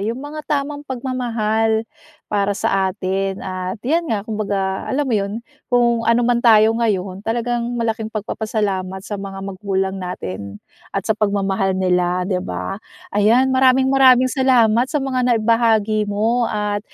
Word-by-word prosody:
yung 225 +4 -2
mga 290 +3 -7
tamang 290 0 -1
pagmamahal 225 -4 -1 0.4
para 200 -1 -1
sa 195 -1 +1
atin 190 +1 -3
at 185 +1 -4
yan 330 +4 0
nga 210 -2 -1
kumbaga 200 -3 -2
alam 290 +2 0
mo 255 - -2
yun? 200 0 -2 0.4
Kung 235 -2 +2
ano 235 +1 +3
man 240 0 +2
tayo 220 -2 +6
ngayon 195 -5 -1
talagang 235 +2 -2
malaking 225 -1 -2
pagpapasalamat 210 -3 -3
sa 205 -2 -5
mga 195 -1 -7
magulang 195 0 -2
natin 100 - -6 0.4
at 195 - -2
sa 220 - +2
pagmamahal 195 -2 0
nila, 180 -1 +1
di 185 -1 -1
ba? 90 - -5 0.3
Ayan, 235 +6 +3
maraming 260 0 +4
maraming 255 -1 +6
salamat 250 -3 +3
sa 300 - -2
mga 260 -1 -1
naibahagi 220 -2 +2
mo 225 +4 +1
at 210 -1 -2
215 Hz, 145 wpm, -20 LUFS, 195-240 Hz, 0.4 s, tayo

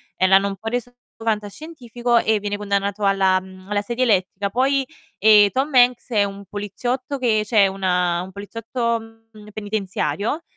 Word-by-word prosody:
e 185 - +2
l'hanno 195 +1 +5
un 195 - -6
po' 225 - -9
reso 245 +1 -4 0.3
fantascientifico 240 +2 -2
e 220 -2 +2
viene 205 0 -3
condannato 200 0 -2
alla, 190 -1 +3
mhmm, 185 +1 -14
alla 205 0 0
sedia 235 +4 -2
elettrica. 200 -2 +1
Poi, 270 +4 +1 0.3
ehm, 210 -1 +6
Tom 270 +2 -1
Hanks 245 0 +4
è 210 -4 +2
un 200 0 -7
poliziotto 245 +8 -4
che 220 -4 +1
cioè 205 -2 +4
una 180 -2 0
un 190 - -10
poliziotto, 230 +3 -3 0.3
mhmm, 210 0 -14
penitenziario 210 - -2
210 Hz, 160 wpm, -21 LUFS, 195-240 Hz, 0.3 s, ehm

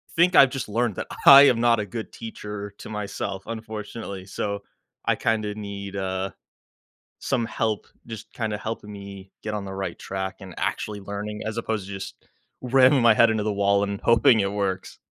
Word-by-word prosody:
think 175 +2 +4
I've 135 - +8
just 135 - -4
learned 115 0 0
that - - -5 0.2
I 140 +1 +11
am 120 -5 +4
not 120 -1 +4
a 105 - -1
good 110 +3 -6
teacher 105 -2 -7
to - - -9
myself, 100 -2 -4
unfortunately, 110 -3 -6
so, 100 +1 -4 0.4
I - - +3
kinda 110 -2 -1
need, 100 -1 -6
uh, 95 0 -2 0.9
some 125 -4 -1
help, 110 -2 -2 0.2
just 110 -3 -9
kinda 110 -3 -2
helping 110 -1 -5
me 100 -1 -10
get 105 - -4
on 105 -2 -3
the 95 - -6
right 95 -3 -4
track 95 0 -4
and 95 -3 -10
actually 105 -1 -2
learning 100 +2 -5
as 110 +1 -3
opposed 110 -4 -2
to 100 - -8
just 95 0 -6 0.5
ramming 130 +1 +5
my 115 -1 +7
head 115 - +6
into 110 -1 0
the 105 0 0
wall 100 0 +2
and 100 0 -2
hoping 115 0 +5
it 100 -1 +1
works. 95 -2 -3
105 Hz, 185 wpm, -25 LUFS, 100-115 Hz, 0.9 s, I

